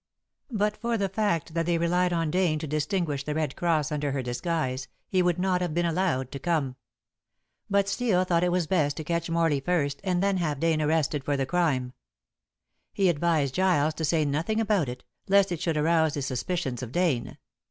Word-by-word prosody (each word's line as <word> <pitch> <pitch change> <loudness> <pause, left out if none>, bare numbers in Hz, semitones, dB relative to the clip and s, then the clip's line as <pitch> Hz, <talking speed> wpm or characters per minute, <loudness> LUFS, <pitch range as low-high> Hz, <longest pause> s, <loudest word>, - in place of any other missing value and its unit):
But 210 -3 0
for 235 +1 -1
the 200 -2 0
fact 185 -6 -1
that 165 0 -1
they 170 -1 +2
relied 180 +2 +1
on 165 -3 0
Dane 180 -3 +2
to 155 - -4
distinguish 150 0 -1
The 150 +1 -3
Red 155 -4 -1
Cross 160 -4 0
under 145 -2 -1
her 135 -2 -2
disguise, 130 +1 -2 0.2
he 185 - +2
would 175 -2 +2
not 180 0 +1
have 175 -3 -2
been 175 0 +1
allowed 165 -7 0
to 140 - -6
come. 145 -5 -1 0.9
But 200 0 +2
Steel 200 -3 +1
thought 175 -2 +1
it 180 - +2
was 180 -1 +1
best 150 -5 +1
to 160 - -4
catch 170 +1 -2
Morley 165 -3 +2
first 145 -2 -1
and 180 -1 0
then 200 -1 +2
have 155 -6 -1
Dane 160 -1 +1
arrested 150 -2 +1
for 145 0 0
the 135 - 0
crime. 135 -6 0 1.0
He 195 -2 +2
advised 155 -4 +1
Giles 175 -5 +2
to 160 - -5
say 155 0 +2
nothing 160 +10 0
about 205 - +1
it, 125 0 -7 0.2
lest 195 -1 +4
it 170 -2 -3
should 165 -3 0
arouse 160 0 +2
the 145 - -2
suspicions 130 0 -2
of 125 -2 -6
Dane. 160 -7 0
165 Hz, 200 wpm, -27 LUFS, 145-180 Hz, 1.0 s, lest